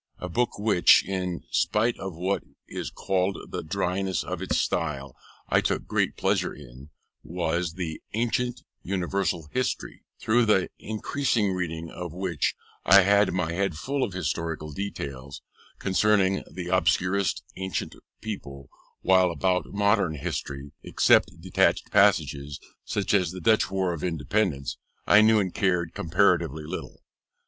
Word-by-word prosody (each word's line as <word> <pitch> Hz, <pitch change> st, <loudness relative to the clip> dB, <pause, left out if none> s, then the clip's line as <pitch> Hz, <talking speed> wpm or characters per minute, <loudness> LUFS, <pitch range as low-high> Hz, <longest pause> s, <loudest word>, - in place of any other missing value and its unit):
A 90 Hz, -, -5 dB
book 120 Hz, +7 st, 0 dB
which, 105 Hz, -4 st, +5 dB
in 90 Hz, -3 st, -3 dB
spite 115 Hz, +3 st, +2 dB
of 95 Hz, -3 st, -5 dB
what 95 Hz, +4 st, -1 dB, 0.2 s
is -, -, -5 dB
called 95 Hz, 0 st, -1 dB
the -, -, -3 dB
dryness 95 Hz, +2 st, -1 dB
of -, -, -5 dB
its -, -, 0 dB
style, 75 Hz, -5 st, -2 dB, 0.3 s
I -, -, +3 dB
took -, -, -1 dB
great -, -, 0 dB
pleasure -, -, 0 dB
in, 65 Hz, 0 st, -13 dB, 0.3 s
was 85 Hz, 0 st, -2 dB
the 80 Hz, -3 st, -5 dB
Ancient 120 Hz, +2 st, -1 dB, 0.2 s
Universal 90 Hz, -3 st, -2 dB
History, 130 Hz, 0 st, -2 dB, 0.2 s
through 120 Hz, +2 st, +3 dB
the 95 Hz, -3 st, +3 dB
incessant 110 Hz, -2 st, -1 dB
reading 80 Hz, -2 st, -4 dB
of 85 Hz, -2 st, -6 dB
which, 90 Hz, -4 st, -1 dB, 0.3 s
I 100 Hz, +2 st, +7 dB
had 100 Hz, +1 st, +4 dB
my 85 Hz, -2 st, -1 dB
head 95 Hz, -3 st, -1 dB
full 135 Hz, -, -1 dB
of 100 Hz, -, -3 dB
historical 80 Hz, -4 st, -3 dB
details 70 Hz, -6 st, -6 dB, 0.3 s
concerning 95 Hz, 0 st, +2 dB
the 90 Hz, -1 st, -6 dB
obscurest 95 Hz, 0 st, +1 dB
ancient 95 Hz, 0 st, -3 dB, 0.3 s
people, 70 Hz, -, -7 dB, 0.3 s
while 95 Hz, -1 st, +4 dB
about 90 Hz, +1 st, 0 dB
modern 100 Hz, -5 st, +1 dB
history, 70 Hz, 0 st, -5 dB
except -, -, +3 dB
detached -, -, +1 dB
passages, 70 Hz, 0 st, +2 dB, 0.3 s
such 100 Hz, -1 st, -1 dB
as 95 Hz, -4 st, +3 dB
the 90 Hz, +2 st, -7 dB
Dutch 110 Hz, +5 st, +3 dB
War 95 Hz, -2 st, 0 dB
of 80 Hz, -, -6 dB
Independence, 80 Hz, -, -1 dB, 0.3 s
I 105 Hz, -, +7 dB
knew 110 Hz, 0 st, +5 dB
and 95 Hz, -3 st, -1 dB
cared 90 Hz, -4 st, 0 dB
comparatively 80 Hz, -2 st, +1 dB
little. -, -, -7 dB
90 Hz, 140 wpm, -26 LUFS, 80-100 Hz, 0.3 s, I